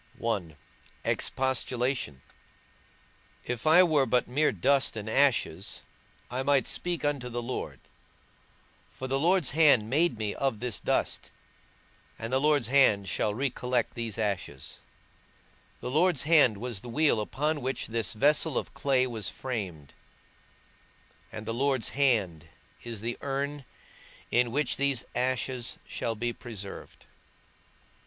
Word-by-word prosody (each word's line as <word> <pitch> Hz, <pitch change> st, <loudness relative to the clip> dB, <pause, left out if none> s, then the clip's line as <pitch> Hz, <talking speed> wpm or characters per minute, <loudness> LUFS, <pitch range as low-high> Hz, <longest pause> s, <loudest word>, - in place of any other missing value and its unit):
I. 95 Hz, -9 st, -2 dB, 0.5 s
EXPOSTULATION. 130 Hz, -, -1 dB, 1.2 s
If 125 Hz, +4 st, -3 dB
I 170 Hz, +4 st, +8 dB
were 150 Hz, -6 st, +3 dB
but 125 Hz, +1 st, +2 dB
mere 150 Hz, +5 st, +2 dB
dust 135 Hz, -3 st, +2 dB
and 105 Hz, 0 st, -5 dB
ashes 135 Hz, +1 st, +1 dB, 0.5 s
I 125 Hz, +1 st, -1 dB
might 135 Hz, -2 st, +3 dB
speak 175 Hz, -3 st, -2 dB
unto 140 Hz, -4 st, -1 dB
the 120 Hz, 0 st, -4 dB
Lord, 80 Hz, -, -5 dB, 1.1 s
for 130 Hz, -, -8 dB
the 135 Hz, +1 st, 0 dB
Lord's 175 Hz, -1 st, +3 dB
hand 135 Hz, -8 st, +4 dB
made 155 Hz, -2 st, +2 dB
me 105 Hz, -2 st, -2 dB
of 135 Hz, -6 st, -1 dB
this 120 Hz, -6 st, -2 dB
dust, -, -, -1 dB, 0.9 s
and 115 Hz, +2 st, -5 dB
the 130 Hz, -, +4 dB
Lord's 145 Hz, -5 st, +3 dB
hand 110 Hz, -8 st, +4 dB
shall 105 Hz, -, 0 dB
re 135 Hz, +2 st, 0 dB
collect 125 Hz, -2 st, -1 dB
these 115 Hz, -3 st, -4 dB
ashes; 100 Hz, -11 st, -3 dB, 1.0 s
the 125 Hz, -, -4 dB
Lord's 165 Hz, +1 st, +3 dB
hand 145 Hz, -8 st, +5 dB
was 115 Hz, -2 st, -5 dB
the 120 Hz, -, -9 dB
wheel 140 Hz, -3 st, +2 dB
upon 150 Hz, +7 st, -1 dB
which 130 Hz, 0 st, -2 dB
this 115 Hz, -4 st, -1 dB
vessel 150 Hz, +5 st, +2 dB
of -, -, -3 dB
clay 130 Hz, -2 st, +2 dB
was 115 Hz, -5 st, -3 dB
framed, 95 Hz, -, -5 dB, 1.4 s
and 110 Hz, -, -7 dB
the 115 Hz, -, -2 dB
Lord's 130 Hz, 0 st, 0 dB
hand 100 Hz, -, +1 dB, 0.3 s
is 115 Hz, -3 st, -6 dB
the 120 Hz, +2 st, -4 dB
urn 140 Hz, 0 st, -3 dB, 0.7 s
in 120 Hz, -1 st, +2 dB
which 145 Hz, +4 st, 0 dB
these 140 Hz, -3 st, 0 dB
ashes 125 Hz, 0 st, -2 dB
shall 115 Hz, -, -3 dB
be 120 Hz, +2 st, -2 dB
preserved. 105 Hz, -6 st, -9 dB
125 Hz, 135 wpm, -28 LUFS, 110-140 Hz, 1.4 s, I